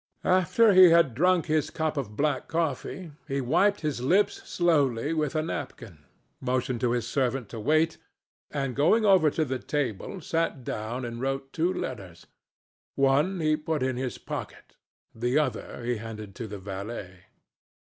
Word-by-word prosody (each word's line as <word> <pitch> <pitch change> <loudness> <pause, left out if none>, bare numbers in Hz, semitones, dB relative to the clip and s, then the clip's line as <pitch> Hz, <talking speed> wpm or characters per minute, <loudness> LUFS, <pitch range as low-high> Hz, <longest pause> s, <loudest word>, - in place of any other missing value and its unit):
After 185 +4 +4
he 185 -1 +9
had 165 -6 +4
drunk 180 +6 +3
his 155 -2 +1
cup 155 -1 -2
of 115 -7 -4
black 145 -2 0
coffee, 165 +2 -3 0.2
he 140 -1 -1
wiped 175 +11 +2
his 150 -6 -2
lips 185 +11 +2
slowly 145 -5 +2
with 155 -2 -1
a 155 - +1
napkin, 100 - -7 0.3
motioned 130 -1 -1
to 120 -2 +2
his 120 -2 -1
servant 130 -2 -1
to 115 - -7
wait, 155 +8 +2 0.5
and 135 -4 -3
going 195 +11 +3
over 190 -6 +5
to 155 +2 -1
the 130 -2 -3
table, 145 - -3
sat 165 -5 -2
down 120 +3 -4
and 120 0 -6
wrote 135 0 -3
two 170 +3 +1
letters. 95 - -6 0.7
One 145 +7 +2
he 155 -1 +3
put 155 -2 -2
in 130 -1 0
his 125 0 -3
pocket, - - -8 0.4
the 120 +4 0
other 130 -4 -2
he 120 0 -1
handed 110 -2 -8
to 115 +1 -6
the 105 0 -7
valet. 95 -1 -7
135 Hz, 160 wpm, -27 LUFS, 120-160 Hz, 0.7 s, he